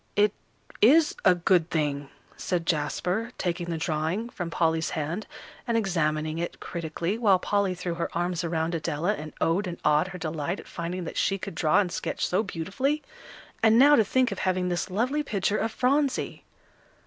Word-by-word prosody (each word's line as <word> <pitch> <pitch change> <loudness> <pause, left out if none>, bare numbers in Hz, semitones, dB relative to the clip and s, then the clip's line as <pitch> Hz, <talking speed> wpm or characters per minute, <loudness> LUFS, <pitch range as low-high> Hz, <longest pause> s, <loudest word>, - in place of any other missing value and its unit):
"It 205 0 +4 0.5
is 300 +8 +6
a 185 - +6
good 175 -1 +2
thing," 145 -3 -1 0.3
said 175 -3 -2
Jasper, 180 +8 -1
taking 175 -1 -2
the 165 - -1
drawing 160 +8 -1
from 175 -7 -5
Polly's 160 -1 +1
hand 165 +7 -3 0.4
and 235 -1 +2
examining 155 -6 0
it 170 - -4
critically, 170 +4 -3
while 200 -5 +5
Polly 200 0 0
threw 180 -1 -3
her 170 0 -3
arms 175 0 -1
around 165 0 -1
Adela, 165 +3 0
and 155 -6 -7
oh 165 +3 +2
ed 205 - -3
and 175 -1 -5
ah 150 0 +5
ed 180 - -2
her 185 -1 -7
delight 160 +2 -3
at - - -12
finding 175 +2 -4
that 165 - -6
she 195 - +1
could 185 - -6
draw 155 0 +3
and 185 -4 0
sketch - - -2
so 185 - +1
beautifully; 225 - -2 0.6
and 225 0 +5
now 285 +4 +8
to 225 - +5
think 255 +4 +1
of - - -4
having 185 -1 0
this 175 +1 -2
lovely 250 +10 0
picture 210 -6 0
of 225 - -1
Phronsie! 275 +3 0
180 Hz, 185 wpm, -27 LUFS, 165-210 Hz, 0.6 s, now